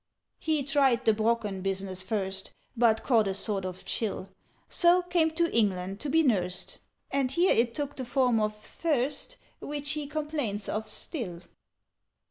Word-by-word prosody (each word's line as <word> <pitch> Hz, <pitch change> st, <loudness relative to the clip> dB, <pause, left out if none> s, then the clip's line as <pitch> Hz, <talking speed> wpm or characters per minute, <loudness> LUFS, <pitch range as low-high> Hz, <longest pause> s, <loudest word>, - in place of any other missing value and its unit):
"He 310 Hz, -3 st, 0 dB
tried 275 Hz, -3 st, +2 dB
the 220 Hz, -, +5 dB
Brocken 215 Hz, -3 st, 0 dB
business 190 Hz, -1 st, -1 dB
first, 190 Hz, -1 st, -3 dB, 0.2 s
But 225 Hz, -2 st, +3 dB
caught 225 Hz, -5 st, +3 dB
a 190 Hz, -, -1 dB
sort 200 Hz, -1 st, -1 dB
of 185 Hz, 0 st, -6 dB
chill; 200 Hz, -3 st, -2 dB, 0.4 s
So 350 Hz, +1 st, +4 dB
came 345 Hz, -2 st, +2 dB
to 335 Hz, -4 st, +1 dB
England 195 Hz, -3 st, +1 dB
to 290 Hz, -, -4 dB
be 325 Hz, +3 st, +4 dB
nursed, 185 Hz, -, 0 dB, 0.3 s
And 270 Hz, -2 st, +1 dB
here 345 Hz, +6 st, +4 dB
it 235 Hz, 0 st, +2 dB
took 290 Hz, -1 st, -2 dB
the 260 Hz, -, -4 dB
form 245 Hz, -2 st, +2 dB
of 215 Hz, 0 st, 0 dB
thirst, 290 Hz, -, -2 dB, 0.2 s
Which 290 Hz, 0 st, -3 dB
he 300 Hz, -1 st, -2 dB
complains 295 Hz, -9 st, -3 dB
of 220 Hz, 0 st, -3 dB
still. 210 Hz, -, -4 dB
235 Hz, 155 wpm, -29 LUFS, 200-290 Hz, 0.4 s, the